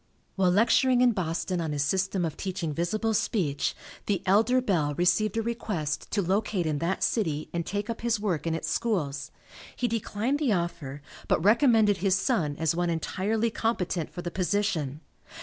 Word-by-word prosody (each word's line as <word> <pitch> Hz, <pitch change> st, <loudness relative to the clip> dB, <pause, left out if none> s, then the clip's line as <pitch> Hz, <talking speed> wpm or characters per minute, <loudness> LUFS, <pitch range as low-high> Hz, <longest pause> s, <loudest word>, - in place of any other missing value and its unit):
While 190 Hz, -2 st, +3 dB
lecturing 245 Hz, +6 st, +4 dB
in 250 Hz, -1 st, +5 dB
Boston 180 Hz, -2 st, -2 dB
on 160 Hz, -2 st, -2 dB
his 145 Hz, -1 st, 0 dB
system 185 Hz, +3 st, 0 dB
of 160 Hz, -, -4 dB
teaching 180 Hz, -5 st, -3 dB
visible 215 Hz, +8 st, -1 dB
speech, 170 Hz, -9 st, 0 dB, 0.3 s
the 200 Hz, -4 st, 0 dB
elder 220 Hz, +7 st, +4 dB
Bell 165 Hz, -, 0 dB
received 205 Hz, +5 st, +2 dB
a 225 Hz, -, +1 dB
request 190 Hz, -10 st, -3 dB
to 205 Hz, -, 0 dB
locate 190 Hz, 0 st, 0 dB
in 150 Hz, -2 st, -1 dB
that 175 Hz, +4 st, -1 dB
city 155 Hz, -9 st, 0 dB
and 170 Hz, -1 st, -1 dB
take 205 Hz, +1 st, -2 dB
up 230 Hz, -, -4 dB
his 235 Hz, -2 st, +1 dB
work 175 Hz, -7 st, -1 dB
in 165 Hz, -, 0 dB
its 165 Hz, -, -4 dB
schools. 160 Hz, -12 st, -1 dB, 0.5 s
He 245 Hz, -, 0 dB
declined 230 Hz, +4 st, -1 dB
the 275 Hz, -8 st, +2 dB
offer, 160 Hz, -6 st, -3 dB, 0.2 s
but 160 Hz, -, +1 dB
recommended 220 Hz, -3 st, +5 dB
his 190 Hz, 0 st, +2 dB
son 175 Hz, -, 0 dB
as 160 Hz, -1 st, +1 dB
one 175 Hz, 0 st, 0 dB
entirely 210 Hz, +7 st, -1 dB
competent 185 Hz, -8 st, -1 dB
for 175 Hz, -, -7 dB
the 175 Hz, -, -4 dB
position. 175 Hz, -6 st, -1 dB
190 Hz, 175 wpm, -27 LUFS, 165-220 Hz, 0.5 s, in